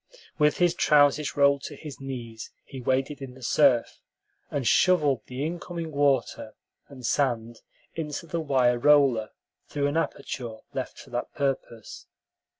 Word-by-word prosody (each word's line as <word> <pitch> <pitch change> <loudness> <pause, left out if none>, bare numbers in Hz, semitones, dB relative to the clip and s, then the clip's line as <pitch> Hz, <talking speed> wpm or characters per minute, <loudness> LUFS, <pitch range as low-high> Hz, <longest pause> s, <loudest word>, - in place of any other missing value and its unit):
With 150 -1 +3
his 175 -1 +3
trousers 145 -2 +3
rolled 140 -1 +4
to - - -7
his 150 -3 -10
knees, 120 -5 -7 0.2
he 130 - -9
waded 135 +3 -1
in 130 -2 -8
the 130 - -14
surf, 130 -2 +3 0.5
and 135 -5 -2
shoveled 150 -9 +3
the 130 +3 -4
incoming 170 0 -5
water 140 -2 0 0.3
and 130 -3 -10
sand 120 -5 0 0.3
into 155 0 -5
the 170 +1 -3
wire 130 -5 +2
roller 135 -6 +4 0.4
through 145 -1 -2
an 145 +2 0
aperture 125 -7 -3 0.2
left - - -5
for - - -13
that 120 0 -3
purpose. 135 -5 -4
140 Hz, 145 wpm, -26 LUFS, 125-150 Hz, 0.5 s, rolled